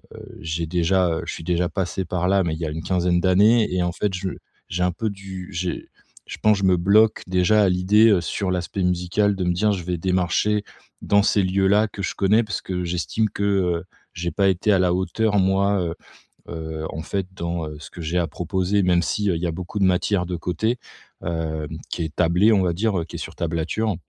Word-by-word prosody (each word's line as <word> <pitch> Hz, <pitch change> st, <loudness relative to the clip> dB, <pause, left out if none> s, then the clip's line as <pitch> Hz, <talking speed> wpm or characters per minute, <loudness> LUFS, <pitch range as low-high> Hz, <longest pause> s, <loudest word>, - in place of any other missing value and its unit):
heu, -, -, -11 dB
j'ai 80 Hz, +1 st, -3 dB
déjà 90 Hz, +1 st, +2 dB
heu -, -, -3 dB
je -, -, -3 dB
suis 80 Hz, -, -8 dB
déjà 90 Hz, 0 st, 0 dB
passé 95 Hz, -1 st, -2 dB
par 90 Hz, +1 st, -1 dB
là 95 Hz, 0 st, +3 dB
mais 80 Hz, -2 st, -1 dB
il -, -, -8 dB
y -, -, -1 dB
a -, -, -2 dB
une 80 Hz, +1 st, -5 dB
quinzaine 90 Hz, -1 st, +1 dB
d'années. 105 Hz, +5 st, +4 dB
Et 90 Hz, -1 st, +1 dB
en 90 Hz, -, 0 dB
fait, 100 Hz, 0 st, -1 dB
je 95 Hz, 0 st, -3 dB, 0.4 s
j'ai 90 Hz, +1 st, -3 dB
un 90 Hz, -, +2 dB
peu 110 Hz, +5 st, -3 dB
du 95 Hz, -2 st, -8 dB
j'ai 90 Hz, +1 st, -4 dB, 0.4 s
je -, -, -7 dB
pense, 105 Hz, -2 st, +4 dB
je 100 Hz, -, -4 dB
me 95 Hz, -1 st, +4 dB
bloque 105 Hz, +5 st, +4 dB
déjà 95 Hz, +4 st, +3 dB
à 95 Hz, -, +4 dB
l'idée 100 Hz, +3 st, +4 dB
sur 95 Hz, +3 st, -2 dB
l'aspect 90 Hz, +3 st, -2 dB
musical 90 Hz, +3 st, +1 dB
de 95 Hz, -, -2 dB
me 90 Hz, -, +2 dB
dire, 105 Hz, +3 st, +2 dB
je 90 Hz, -3 st, -4 dB
vais 90 Hz, 0 st, -2 dB
démarcher 95 Hz, +3 st, +1 dB, 0.4 s
dans 100 Hz, 0 st, +4 dB
ces 100 Hz, -2 st, +2 dB
lieux 95 Hz, +1 st, +1 dB
là, 105 Hz, +2 st, +4 dB
que 100 Hz, -, -8 dB
je -, -, -3 dB
connais, 105 Hz, +4 st, +3 dB
parce 110 Hz, -, -4 dB
que 90 Hz, -1 st, -3 dB
j'estime 90 Hz, -, -1 dB
que, 100 Hz, -, -4 dB
heu, 90 Hz, -4 st, +1 dB, 0.3 s
j'ai 85 Hz, -1 st, -3 dB
pas 95 Hz, +4 st, +2 dB
été 95 Hz, +3 st, +1 dB
à 95 Hz, -, +3 dB
la 90 Hz, -1 st, +3 dB
hauteur 105 Hz, +3 st, 0 dB
moi, 95 Hz, +1 st, +2 dB
heu 85 Hz, -1 st, -2 dB, 0.6 s
heu, 80 Hz, -1 st, -5 dB
en 80 Hz, -, -5 dB
fait 95 Hz, +1 st, -2 dB
dans 85 Hz, -2 st, -3 dB
ce -, -, -10 dB
que 85 Hz, -, -9 dB
j'ai 85 Hz, +3 st, -1 dB
à 85 Hz, -, 0 dB
proposer 95 Hz, +5 st, -1 dB
même 90 Hz, -1 st, +3 dB
s'il 95 Hz, +4 st, 0 dB
y 85 Hz, +1 st, -2 dB
a -, -, -1 dB
beaucoup 90 Hz, +5 st, -5 dB
de -, -, +2 dB
matière 90 Hz, 0 st, +1 dB
de 90 Hz, -, -3 dB
côté, 110 Hz, +9 st, -1 dB, 0.5 s
hem, 80 Hz, -2 st, -3 dB, 0.2 s
qui -, -, -3 dB
est 75 Hz, -, -8 dB
tablée, 90 Hz, +6 st, +4 dB
on 100 Hz, -, +3 dB
va 85 Hz, -2 st, +1 dB
dire, 100 Hz, -2 st, 0 dB
qui -, -, -10 dB
est -, -, -8 dB
sur -, -, -7 dB
tablature. 85 Hz, +5 st, -1 dB
90 Hz, 230 wpm, -23 LUFS, 85-100 Hz, 0.6 s, d'années